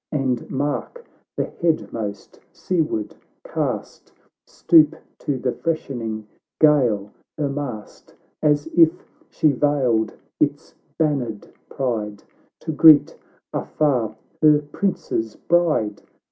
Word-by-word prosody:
And 130 -5 -1
mark 145 - -3 0.3
the - - +1 0.2
headmost, 110 - -2
seaward 155 - -2 0.3
cast, - - -4 0.4
Stoop 160 -3 +4 0.2
to 140 - -2
the 125 0 -1
freshening 120 -9 -3 0.3
gale 120 -10 +3 0.3
her 150 -2 0
mast, 135 -7 -7 0.3
As 150 -1 +2
il 165 -2 +7 0.4
she 155 - +2
vailed 130 -6 +1 0.3
J - - +6
its - - -17 0.2
bannered 135 -9 -1 0.2
pride, 105 -6 -3 0.4
To - - -3
greet 155 -1 +7 0.4
afar 125 -8 0 0.3
her 150 -1 +5
prince's 115 - -2
bride 160 -12 +1
140 Hz, 100 wpm, -22 LUFS, 110-155 Hz, 0.4 s, il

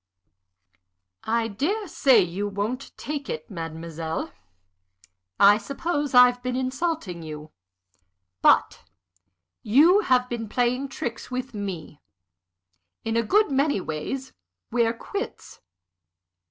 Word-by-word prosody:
"I 230 0 +1
dare 345 - -2
say 265 -8 +5
you 185 +4 -3
won't 205 +6 -3
take 290 -1 -5
it, 155 +6 -5
mademoiselle. 165 -1 -5 1.1
I 205 +1 +7
suppose 290 +3 -2
I've 250 0 +7
been 250 0 -2
insulting 260 - -2
you. 155 -1 -8 0.9
But - - +4 0.8
you 315 - +5
have 255 -9 +2
been 230 -3 -5
playing 250 +4 0
tricks 240 -2 -5
with 255 +1 -4
me. 185 -8 -6 1.0
In 225 0 -1
a 230 - +3
good 410 - +2
many 275 -3 +2
ways, 185 - -5 0.4
we're 230 -1 +2
quits. 405 - -7
240 Hz, 105 wpm, -25 LUFS, 200-275 Hz, 1.1 s, I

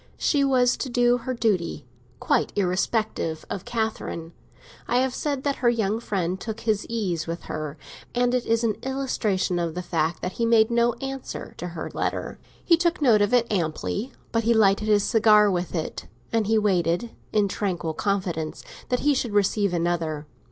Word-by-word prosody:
She 285 -2 +2
was 255 -3 +3
to 265 - -3
do 245 0 +3
her 255 +2 -3
duty, 180 - 0 0.3
quite - - +1
irrespective 190 -3 -1
of 195 - -4
Catherine. 220 -8 -3 0.5
I 245 - +2
have 260 0 +1
said 280 -2 -2
that 280 -1 0
her 240 - +3
young 220 -2 0
friend 190 -5 -2
took 220 +1 -5
his 215 -3 0
ease 185 -9 -2
with 165 +1 -4
her, 155 0 -5 0.4
and 245 0 +2
it 250 -1 0
is 230 +1 +2
an 220 -3 +1
illustration 225 -9 -1
of 170 -1 -2
the 180 - -3
fact 160 -1 -1
that 180 - -1
he 235 - -3
made 225 0 +4
no 235 0 +3
answer 270 +2 -6
to 175 - -5
her 170 -2 -6
letter. - - -3 0.3
He 335 - +5
took 340 +1 +1
note 235 -8 +5
of 205 - +2
it, 245 -2 +4
amply; 195 - -2 0.2
but 230 0 +1
he 230 +1 +3
lighted 210 0 +3
his 205 -1 +4
cigar 210 -2 +5
with 180 -1 -2
it, 160 - -4 0.3
and 225 -3 +2
he 220 +1 +3
waited, 190 +1 +1 0.2
in 210 -2 +3
tranquil 180 -5 -2
confidence 180 -4 -2 0.3
that 250 -1 +1
he 295 0 +3
should 245 -5 -2
receive 205 -1 +2
another. 165 -3 -1
215 Hz, 180 wpm, -25 LUFS, 180-240 Hz, 0.5 s, He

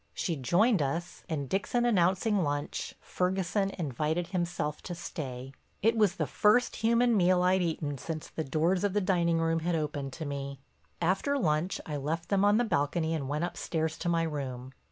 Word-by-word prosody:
She 170 - -1
joined 175 - +3
us 165 +5 -3
and, 145 -4 -2
Dixon 205 - 0
announcing 195 -1 +2
lunch, 145 -2 -2
Ferguson 190 +2 0
invited 160 +2 -1
himself 175 -5 -2
to 175 - -6
stay. 135 -5 -6 0.3
It 225 +2 +4
was 210 -5 +3
the - - -1
first 215 +4 +3
human 235 +1 +3
meal 180 -2 +4
I'd 185 +1 +3
eaten 155 -5 -2
since 155 +1 -5
the 160 - -4
doors 165 +7 +1
of 200 -2 +1
the 210 - +3
dining 175 -3 +2
room 165 0 +1
had 170 +1 0
opened 145 -3 -2
to 160 - -5
me. 140 -1 -5 0.4
After 195 +12 +1
lunch 165 - 0
I 150 -2 -3
left 160 +4 -3
them 200 -1 +3
on 205 +1 +5
the 240 - +3
balcony 160 -4 0
and 140 -5 -3
went 150 +3 -1
upstairs 160 -2 -2
to 175 - -1
my 165 -1 +2
room. 135 -5 -4
170 Hz, 180 wpm, -30 LUFS, 150-190 Hz, 0.4 s, on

